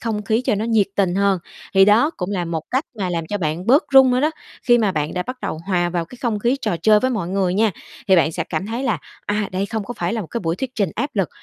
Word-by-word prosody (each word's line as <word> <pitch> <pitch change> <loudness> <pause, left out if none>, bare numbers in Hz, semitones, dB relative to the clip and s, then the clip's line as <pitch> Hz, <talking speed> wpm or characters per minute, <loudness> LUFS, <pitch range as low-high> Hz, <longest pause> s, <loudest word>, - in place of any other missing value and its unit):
không 220 -2 -2
khí 220 +4 0
cho - - +2
nó 210 +2 -2
nhiệt 225 -3 +2
tình 190 -3 +2
hơn. 200 -1 +2 0.4
Thì 195 0 +7
đó 220 +9 +4
cũng 180 +1 -3
là 185 -3 -1
một 165 -2 -3
cách 265 +4 0
mà 185 -3 -1
làm 165 -2 -2
cho 205 +4 -3
bạn 165 +1 -2
bớt 275 +5 +5
run 265 -1 +7
nữa 250 0 +2
đó. 305 +3 +2 0.3
Khi 240 -2 +4
mà 210 -4 +1
bạn 150 -2 -2
đã 180 - -1
bắt 255 +5 -7
đầu 160 - -4
hòa 175 -3 +1
vào 170 -1 -1
cái 240 +9 -14
không 230 -4 0
khí 240 +6 +1
trò 175 - 0
chơi 210 +4 +4
với 255 - +1
mọi 205 -9 -2
người 185 -1 0
nha, 215 +2 +3 0.4
thì 190 - +6
bạn 165 -1 +3
sẽ 165 0 -2
cảm 160 +4 -3
thấy 230 +4 -3
là, 225 - 0 0.3
à, 205 -1 -1
đây 190 +2 -1
không 220 -1 -3
có 245 - -6
phải - - -2
là 230 - -1
một 195 - -6
cái 235 - -4
buổi 165 -2 -1
thuyết 260 +5 -4
trình 200 -7 0
áp 275 +5 -2
lực, 195 -5 0
205 Hz, 300 wpm, -21 LUFS, 180-230 Hz, 0.4 s, Thì